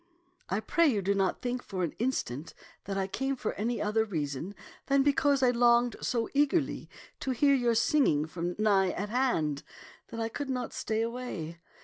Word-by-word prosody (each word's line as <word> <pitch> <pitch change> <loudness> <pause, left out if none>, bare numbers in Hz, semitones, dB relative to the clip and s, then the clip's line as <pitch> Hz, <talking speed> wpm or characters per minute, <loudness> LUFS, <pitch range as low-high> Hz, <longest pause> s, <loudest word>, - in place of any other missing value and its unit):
I 195 +3 0
pray 335 +8 +3
you 215 -8 +1
do 200 +2 +2
not 195 -2 0
think 250 0 -2
for 185 -5 -4
an 170 - -2
instant 165 - -2 0.3
that 195 0 -3
I 195 - +1
came 270 +8 -2
for 245 - -3
any 230 +3 -2
other 215 +2 +1
reason 160 -1 -4 0.3
than 275 0 +4
because 280 -1 +3
I 250 - +5
longed 240 -1 +4
so 235 -3 0
eagerly 290 +2 +1 0.3
to - - -4
hear 280 +3 +3
your 240 -3 +2
singing 220 - +3
from 170 +2 -4
nigh 200 -3 +3
at 205 +2 -4
hand 165 - 0 0.5
that 230 - -7
I 225 - 0
could 275 +4 -5
not 250 -2 -3
stay 220 0 -1
away. 230 -9 -5
225 Hz, 185 wpm, -30 LUFS, 190-255 Hz, 0.5 s, I